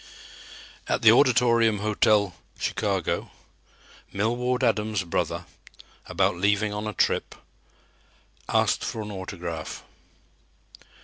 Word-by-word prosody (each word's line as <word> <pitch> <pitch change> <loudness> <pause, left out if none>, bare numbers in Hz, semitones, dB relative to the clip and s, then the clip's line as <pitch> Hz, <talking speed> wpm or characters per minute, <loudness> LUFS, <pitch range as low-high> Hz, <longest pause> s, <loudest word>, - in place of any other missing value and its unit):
At - - -1
the 110 - +9
Auditorium 120 -3 +4
hotel, 105 -1 +2 0.2
Chicago, 100 -7 -2 0.8
Millward 125 +5 -1
Adams' 110 -4 +1
brother, 85 - -2 0.6
about 90 - +1
leaving 105 +2 +1
on 105 +1 -4
a 105 - -4
trip, - - 0 1.1
asked - - +2
for 110 - -4
an 105 - -7
autograph. 90 -4 -6
105 Hz, 90 wpm, -25 LUFS, 100-115 Hz, 1.1 s, the